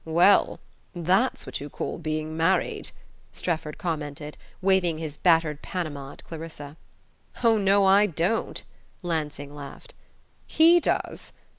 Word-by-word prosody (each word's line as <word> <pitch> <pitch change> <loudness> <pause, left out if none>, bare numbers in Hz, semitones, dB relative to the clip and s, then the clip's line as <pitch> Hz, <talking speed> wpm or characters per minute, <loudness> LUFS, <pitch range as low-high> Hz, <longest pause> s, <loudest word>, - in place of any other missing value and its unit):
"Well 170 +5 +4 0.4
that's 185 +9 +1
what - - -5
you 145 - -6
call - - -5
being 155 0 -3
married!" 165 +4 +1 0.4
Strefford 160 -3 -3
commented, 150 -3 -4 0.2
waving 185 -4 +2
his 155 -2 -5
battered 160 -3 +2
Panama 150 -7 -5
at - - -13
Clarissa. 155 -3 -8 0.7
"Oh, 225 -2 +4
no, 200 0 +4
I 200 +2 +6
don't!" 175 +5 -1 0.4
Lansing 150 -4 -3
laughed. 145 - -10 0.5
"He 335 +2 +6
does. - - -2
165 Hz, 120 wpm, -26 LUFS, 150-190 Hz, 0.7 s, I